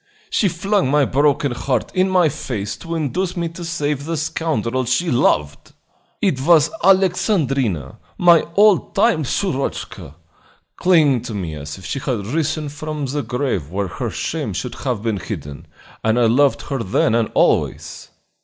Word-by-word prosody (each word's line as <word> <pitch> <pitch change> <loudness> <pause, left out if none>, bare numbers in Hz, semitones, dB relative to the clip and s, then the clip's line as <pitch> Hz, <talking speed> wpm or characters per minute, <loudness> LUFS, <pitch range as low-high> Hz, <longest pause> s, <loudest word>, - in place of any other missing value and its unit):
She 210 - +2
flung 190 -1 0
my 145 0 +3
broken 140 +1 +1
heart 125 -1 -2
in 185 +1 +2
my 180 -3 +4
face 110 -7 -4
to 165 0 -6
induce 175 +4 -2
me 170 -1 -1
to 170 +1 -9
save 150 -4 -2
the 165 0 -2
scoundrel 130 -5 -1
she 130 +8 0
loved! 75 - 0 0.5
"It 155 -10 +1
was 160 0 +4
Alexandrina, 150 - +1 0.2
my 170 -2 +5
old 205 -2 +4
time 200 -6 +3
Shurochka, 135 - -3 0.6
clinging 155 -9 +3
to 115 -2 -6
me 85 -6 -4
as 75 0 -7
if 95 - -12
she 140 - -3
had 120 -6 -3
risen 155 +4 -1
from 150 0 -5
the 145 +2 -2
grave 125 - -2
where 95 +2 -2
her - - -4
shame - - -3
should - - -4
have 120 -5 -3
been 110 -3 -1
hidden, 70 -4 -7 0.4
and 110 +2 +2
I 120 - +4
loved 130 +5 +3
her 135 -2 -3
then 105 +1 +1
and 115 -1 +1
always. - - 0
140 Hz, 160 wpm, -20 LUFS, 115-165 Hz, 0.6 s, my